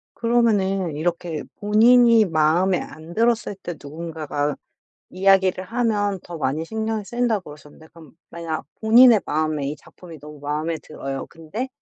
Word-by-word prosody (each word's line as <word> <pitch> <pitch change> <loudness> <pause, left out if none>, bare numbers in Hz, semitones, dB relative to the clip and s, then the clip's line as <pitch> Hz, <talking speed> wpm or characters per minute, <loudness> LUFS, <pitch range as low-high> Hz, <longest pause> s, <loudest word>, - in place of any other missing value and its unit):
그러면은 200 -8 +1
이렇게 165 0 -3 0.2
본인이 230 +2 +5
마음에 170 +2 +2
안 160 +2 -10
들었을 230 -1 +1
때 175 - -5
누군가가 150 -1 -4 0.5
이야기를 190 -1 +2
하면 205 -4 -1
더 170 -1 -8
많이 150 +2 -1
신경이 220 +2 -3
쓰인다 240 0 0
그러셨는데 150 0 -14
그럼 160 -5 -15 0.2
만약 165 -3 -5 0.2
본인의 230 0 +6
마음에 155 -2 -1
이 145 - -4
작품이 165 +1 -14
너무 150 0 -12
마음에 155 +3 -3
들어요. 135 -3 -6
근데 175 +11 -6
175 Hz, 335 characters per minute, -22 LUFS, 155-220 Hz, 0.5 s, 본인의